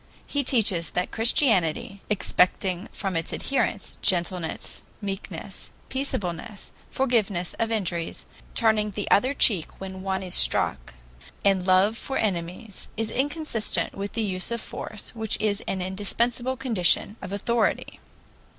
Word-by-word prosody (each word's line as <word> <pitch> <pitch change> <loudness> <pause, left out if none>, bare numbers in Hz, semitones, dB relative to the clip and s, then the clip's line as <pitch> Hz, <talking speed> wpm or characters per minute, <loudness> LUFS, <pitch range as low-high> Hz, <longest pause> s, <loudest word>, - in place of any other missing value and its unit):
He 285 -1 -1
teaches 210 -10 +3
that 180 - -2
Christianity, 200 - +2
expecting 185 -1 +1
from 195 -3 -3
its 165 -1 -1
adherents 235 -6 -1
gentleness, 180 -3 -1 0.2
meekness, 195 -1 -6 0.2
peaceableness, 210 -6 -3 0.2
forgiveness 215 -9 +1
of 230 0 0
injuries, 175 -6 -2 0.3
turning 220 -2 +3
the 205 0 -4
other 260 +7 +4
cheek 190 - +2
when 190 -1 -6
one 190 0 -1
is 180 -1 -4
struck, - - +1 0.5
and 195 -2 +3
love 190 +4 +5
for 270 - -3
enemies, 185 +1 -3
is 225 0 -1
inconsistent 285 -4 0
with 200 +1 -5
the 225 0 -1
use 185 -3 +1
of 235 0 -1
force, 215 -1 -6
which 220 -2 0
is 210 -1 +1
an 190 -1 -1
indispensable 235 +7 0
condition 215 -5 +2
of 190 - -6
authority. 225 +3 0
205 Hz, 130 wpm, -26 LUFS, 185-230 Hz, 0.5 s, love